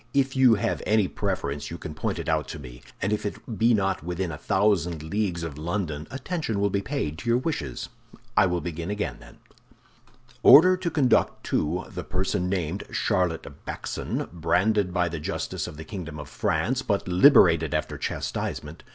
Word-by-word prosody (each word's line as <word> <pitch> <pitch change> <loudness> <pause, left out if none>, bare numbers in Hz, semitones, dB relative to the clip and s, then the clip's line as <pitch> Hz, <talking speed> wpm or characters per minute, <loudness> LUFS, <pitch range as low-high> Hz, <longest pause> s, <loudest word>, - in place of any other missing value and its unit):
"If 135 -1 +2
you 130 -3 +6
have 100 - -1
any 105 -2 +3
preference 90 -8 -3
you 85 - -6
can 80 - -7
point 75 - -2
it - - -5
out 75 -4 +1
to - - -6
me; 60 -4 -11 0.2
and 100 +3 +1
if 105 - -1
it 105 +2 -6
be 115 +2 +5
not 95 -4 +1
within 90 +2 -3
a 75 - -6
thousand 90 -6 +1
leagues 90 0 -1
of 75 -3 -6
London, 80 -3 -3
attention 135 - -3
will 100 0 +1
be 100 - 0
paid 85 - -3
to 120 - -4
your 120 - +4
wishes. 125 - -3 0.5
I 105 -2 +5
will 90 -1 -1
begin 85 +1 -5
again, 105 0 -2
then: - - -15 1.0
"'Order 165 +8 +9
to 180 -1 -2
conduct 145 -6 +2
to—the 85 +5 -2
person 90 -1 -1
named 90 0 -2
Charlotte 90 -3 0 0.2
Backson, - - -3
branded 90 +4 +1
by 90 -1 +1
the 85 -1 -4
justice 75 - -3
of 75 - -9
the 80 - -8
kingdom 85 -7 -6
of 75 - -7
France, 130 +2 0
but 100 -6 -1
liberated 90 - +5
after - - -2
chastisement. 75 +3 -4
90 Hz, 175 wpm, -26 LUFS, 80-110 Hz, 1.0 s, Order